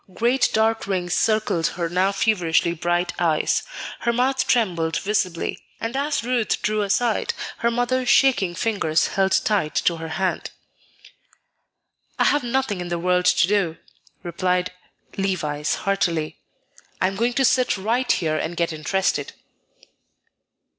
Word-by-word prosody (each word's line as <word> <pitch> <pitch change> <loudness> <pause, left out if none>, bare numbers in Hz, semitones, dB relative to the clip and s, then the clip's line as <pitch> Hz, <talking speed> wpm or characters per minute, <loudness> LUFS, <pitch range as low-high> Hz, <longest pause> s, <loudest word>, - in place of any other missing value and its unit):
Great 245 +5 +2
dark 220 -1 +1
rings 180 -3 -1
encircled 215 -6 +1
her 170 -1 -1
now 185 +3 +1
feverishly 180 -5 +1
bright 175 +1 -1
eyes; 165 -3 +1 0.4
her 235 - 0
mouth 255 +3 +1
trembled 170 -9 +1
visibly; 195 -4 -1 0.2
and 230 +3 -4
as 285 -1 -1
Ruth 240 -2 0
drew 215 0 +1
aside, 215 +3 0 0.2
her 235 - +1
mother's 245 +1 0
shaking 220 -12 +3
fingers 170 -6 0
held 195 -1 +1
tight 195 -8 0
to 170 - +1
her 165 0 -6
hand. 185 +4 -2 1.7
"I - - +3
have 290 - +3
nothing 240 -6 -1
in 175 - -5
the 175 0 -2
world 180 +1 +1
to 180 - +4
do," 195 -5 0 0.5
replied 180 +1 -1 0.5
Levice, 155 -6 -1
heartily; 170 -6 -1 0.6
"I - - +2
am 195 +1 -1
going 235 +4 0
to 270 +1 +2
sit 255 -3 +2
right 230 +6 0
here 155 -2 0
and 170 +2 -4
get 170 -1 0
interested." 185 +5 -1
195 Hz, 140 wpm, -22 LUFS, 170-230 Hz, 1.7 s, to